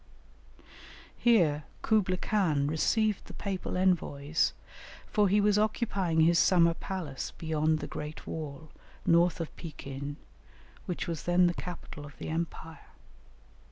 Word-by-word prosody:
Here 170 -11 +3 0.2
Kublaï 190 -5 +2
Khan 165 -10 +1
received 205 +8 +1
the - - -11
papal 190 -2 -3
envoys, 160 -5 +1 0.5
for 205 -3 +2
he 205 +2 +4
was 205 0 +3
occupying 200 -6 +1
his 165 +1 +5
summer 170 -3 +5
palace 165 -6 -5
beyond 155 -1 +1
the - - -5
great 150 +1 -7
wall, 155 -1 -6 0.3
north 170 +1 +4
of 165 - -5
Pekin, 140 -3 -7 0.7
which 180 - -3
was 165 -3 -4
then 175 +1 +4
the 175 - +2
capital 170 -4 -7
of 145 -1 -12
the - - -6
empire. 160 -1 -5
170 Hz, 125 wpm, -30 LUFS, 155-190 Hz, 0.7 s, his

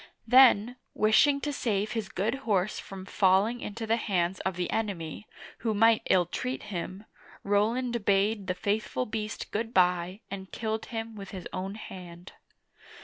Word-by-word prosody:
Then, 245 -1 +6 0.2
wishing 280 +7 +4
to 295 0 -2
save 215 -5 -1
his 220 -4 -3
good 205 +5 -1 0.2
horse 195 0 +1
from 190 -1 -9
falling 195 +5 +2
into 225 +2 -5
the 225 +1 +2
hands 185 -4 0
of 190 -2 -2
the 180 -1 -2
enemy, 200 -4 -3 0.3
who 220 -2 -1
might 225 +1 +5
illtreat 185 +8 +1
him, 185 +4 -5 0.4
Roland 230 +3 +1
bade 200 0 +2
the 185 - -1
faithful 210 +6 -1
beast 215 0 -5
good 225 +2 -3
by 180 +2 +2
and 190 -1 -7
killed 220 -1 -3
him 225 -1 -5
with 195 -2 -8
his 185 -3 -7
own 190 +2 -4
hand. 180 -4 -10
205 Hz, 150 wpm, -28 LUFS, 190-225 Hz, 0.4 s, Then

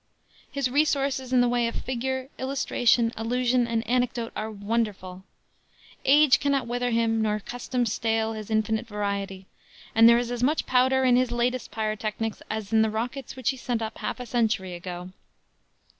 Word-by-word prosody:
His 280 -2 0
resources 275 -2 0
in 255 -1 +5
the 245 - +3
way 240 -1 +1
of 230 - -4
figure, 260 +1 -3
illustration, 245 -3 +1
allusion 245 +2 +1
and 230 -1 -1
anecdote 245 -1 0
are 215 - -3
wonderful. 205 -3 -3 0.8
Age 290 0 +6
cannot 280 -2 +1
wither 245 +1 -1
him 230 -1 +1
nor 215 -1 0
custom 245 +2 -3
stale 225 0 0
his 215 -1 -7
infinite 220 +1 0
variety, 200 -2 -3 0.5
and 225 +1 +7
there 235 - +6
is 240 0 -2
as 240 -1 -3
much 295 +5 +1
powder 260 +1 +3
in 250 -1 +5
his 255 -1 +2
latest 240 +1 -1
pyrotechnics 215 0 -3
as 215 0 -4
in 220 - +5
the 220 - +3
rockets 240 +5 -4
which 260 -1 0
he 265 - -8
sent 240 -2 -2
up 220 0 -6
half - - -4
a 250 - -5
century 220 -6 0
ago. 180 +1 -7
235 Hz, 170 wpm, -26 LUFS, 220-250 Hz, 0.8 s, and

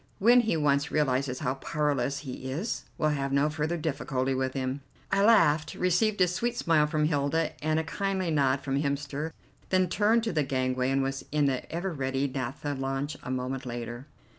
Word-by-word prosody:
When 240 +5 +6
he 225 -8 +1
once 145 -1 +2
realizes 130 -3 0
how 125 - 0
powerless 140 -1 -1
he 130 -2 -6
is, 180 - -3
we'll 155 - +2
have 140 -2 -2
no 140 +2 +2
further 155 +2 -1
difficulty 135 -4 -1
with 130 0 -1
him." 130 +1 -2 0.3
I 195 - +3
laughed, 155 -9 +4
received 190 +4 +1
a 180 - +6
sweet 235 +7 -1
smile 155 -3 +3
from 150 0 +1
Hilda 150 +1 +1
and 155 +1 +2
a - - -1
kindly 190 +1 -1
nod 140 -3 +2
from 135 0 -1
Hemster, 145 +2 -2 0.4
then 185 -1 +2
turned 215 +5 +3
to 225 - -1
the 155 - +2
gangway 130 -2 0
and 135 0 +2
was 135 0 -3
in 150 -1 +2
the 135 -2 -1
ever 175 +2 -2
ready 135 -1 -1
naptha 135 +2 -3
launch 135 +2 -2
a - - -8
moment 130 +1 -2
later. 120 +1 -6
145 Hz, 190 wpm, -28 LUFS, 135-165 Hz, 0.4 s, When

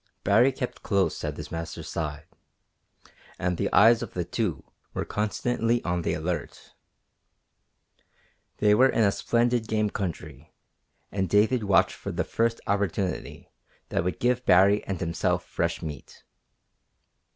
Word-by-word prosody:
Baree 110 +7 +4
kept 125 -1 -5
close 100 -2 0
at - - -3
his - - -8
master's 80 -1 -6
side, 75 -1 -4 1.1
and 90 0 -1
the - - -1
eyes 115 +2 +6
of - - -7
the 90 -2 -1
two 90 - -2 0.3
were - - -2
constantly 115 +2 0
on 90 0 -1
the - - -1
alert. 80 -1 -5 1.8
They 105 -1 +4
were 130 +5 +5
in 115 - +2
a 100 - +4
splendid 120 +1 +1
game 110 -2 0
country, 80 -6 -6 0.6
and 95 -2 -1
David 110 +4 +3
watched 95 -2 +3
for - - -5
the - - -1
first 115 0 0
opportunity 100 -2 -2 0.4
that - - 0
would 90 -2 -3
give 125 0 +1
Baree 100 +2 +5
and 95 -3 -3
himself 85 -2 -1
fresh - - -2
meat. 75 -5 -8
100 Hz, 140 wpm, -26 LUFS, 85-115 Hz, 1.8 s, eyes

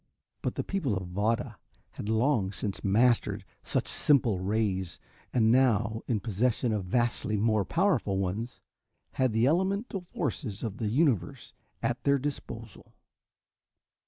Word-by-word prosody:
But - - -2
the - - -2
people 145 - -1
of 95 -1 -5
Vada 110 +4 -1 0.3
had 105 - -6
long 110 -3 +2
since 95 +1 -4
mastered 115 +4 +2 0.2
such - - -1
simple 120 -9 +2
rays, 95 -4 -1 0.3
and 110 -2 +3
now, 115 -3 +3
in 115 -4 +1
possession 115 +3 0
of 105 -3 -2
vastly 110 +1 0
more 110 -1 +2
powerful 155 - +1
ones, 100 +6 -3 0.5
had 130 -2 +1
the 110 +2 +2
elemental 190 - 0
forces 115 - -3
of 110 -2 -4
the 110 - -2
universe 115 - 0 0.3
at 120 - -1
their 140 0 +4
disposal. 120 -6 -7
115 Hz, 130 wpm, -29 LUFS, 100-130 Hz, 0.5 s, their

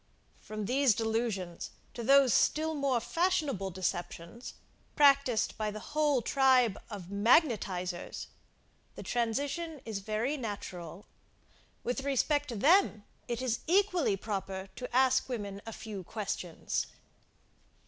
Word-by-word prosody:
From 215 -1 -6
these 255 0 +3
delusions 220 -6 -2 0.2
to 240 - -6
those 270 -1 +6
still 315 +1 +2
more 275 -4 +1
fashionable 300 - 0
deceptions, 180 +3 -4 0.4
practised 275 -5 +4
by 215 -1 0
the 210 0 -6
whole 295 -5 +2
tribe 255 -5 +3
of 195 -4 -8
magnetisers, 200 - +1 0.7
the - - -8
transition 280 +7 -2
is 220 -3 -3
very 220 +8 -1
natural. 195 - -6 0.8
With 250 +3 -2
respect 285 +1 +1
to 235 - -4
them, 285 - +4 0.2
it 240 +1 -3
is 240 -3 0
equally 360 - +3
proper 195 -2 -4
to 250 - -6
ask 260 0 +3
women 200 -5 -4
a - - -4
few 210 -4 -7
questions. 185 -4 -3
235 Hz, 115 wpm, -31 LUFS, 200-275 Hz, 0.8 s, those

